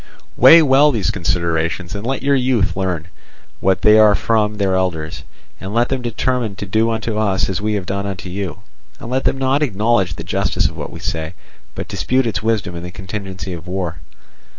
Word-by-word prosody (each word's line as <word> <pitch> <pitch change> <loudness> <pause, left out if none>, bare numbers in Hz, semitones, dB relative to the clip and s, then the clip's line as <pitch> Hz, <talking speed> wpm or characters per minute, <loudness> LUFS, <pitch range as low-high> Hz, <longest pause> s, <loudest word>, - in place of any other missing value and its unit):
"Weigh 160 +6 +8
well 145 +1 +5
these 110 -8 0
considerations, 85 -1 -1
and 105 +3 -5
let 135 +1 -2
your 140 +1 +3
youth 125 -8 +1
learn 90 -4 -2 0.5
what 95 0 +1
they 105 0 +7
are 105 -1 +6
from 105 -1 0
their 100 -2 +1
elders, 85 -4 -2 0.4
and 95 +3 -6
let 120 +1 +2
them 135 -1 -1
determine 120 -2 -1
to 100 - -6
do 110 +4 +1
unto 110 -1 -2
us 100 -3 +1
as 95 0 -3
we 105 0 0
have 100 -3 -3
done 100 +2 -3
unto 95 -2 -6
you. 95 +1 -5 0.4
And 115 - -8
let 130 +1 0
them - - +1
not 135 +2 +1
acknowledge 105 - +1
the - - -7
justice - - 0
of - - -8
what - - -6
we - - -9
say, 80 +1 -4 0.4
but - - -5
dispute 130 0 0
its 110 -3 -1
wisdom 105 -5 -1
in 85 - -5
the 90 - -6
contingency 95 0 -6
of 85 +1 -9
war. 90 -2 -3
100 Hz, 200 wpm, -18 LUFS, 95-115 Hz, 0.5 s, Weigh